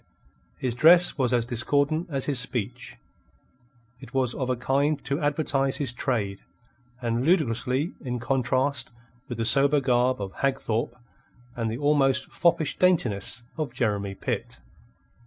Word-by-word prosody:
His 125 -2 -1
dress 170 +7 +5
was 130 -4 0
as 120 -2 +2
discordant 145 - 0
as 135 -4 -2
his 140 -4 +1
speech. 125 -1 -3 1.0
It - - -13
was 130 -3 +1
of 130 -2 -3
a 130 - +1
kind 140 +5 +1
to 140 +1 -1
advertise 145 -2 0
his 135 -5 -1
trade, 105 -7 -2 0.6
and 115 +1 0
ludicrously 135 -2 +1
in 125 -2 -3
contrast 130 +3 0 0.4
with 120 - -5
the 115 - -1
sober 140 +5 +5
garb 125 -2 +1
of 100 -2 -5
Hagthorpe 120 -4 -1 0.6
and 115 -2 -2
the 115 - -4
almost 140 -2 +2
foppish 165 -3 +1
daintiness 120 - +2 0.2
of 155 -3 -3
Jeremy 100 -4 -1
Pitt. - - -4
130 Hz, 140 wpm, -26 LUFS, 120-145 Hz, 1.0 s, dress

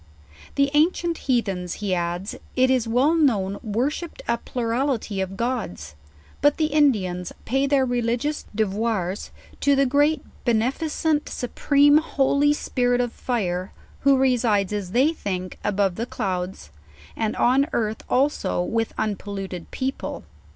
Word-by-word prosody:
The 280 0 +2
ancient 335 +2 +2
Heathens, 195 -8 0
he 205 -3 -2
adds, 175 +2 -2 0.2
it 260 0 +4
is 250 -3 +2
well 255 +7 +3
known 210 - +2
worshipped 255 +10 -2
a 235 0 +1
plurality 235 -4 -1
of 190 0 -4
Gods, 205 - -3 0.5
but 290 0 +4
the 310 -2 0
Indi 280 -10 +4
ans 180 0 -5
pay 270 +4 +1
their 275 -2 +3
religious 245 +4 -1
devoirs 205 -2 -1 0.3
to 285 -1 +3
the 275 0 +3
great 290 +4 +2 0.2
beneficient 295 +6 0
su 245 - -4
preme 290 +3 +5
holy 285 -1 +2
Spirit 245 -4 0
of 245 -1 -1
Fire, 185 -7 -2 0.3
who 275 -1 +4
resides, 230 -7 +2
as 205 -3 -3
they 270 +7 +4
think, 185 - -4
above 195 -3 +1
the 230 - -2
clouds, 185 - -4 0.4
and 220 -1 -1
on 270 +4 +3
earth 220 -1 -1
also 265 -8 +1
with 225 +4 -1
unpolluted 195 -4 -4
people. 265 +1 -4
240 Hz, 135 wpm, -24 LUFS, 200-275 Hz, 0.5 s, preme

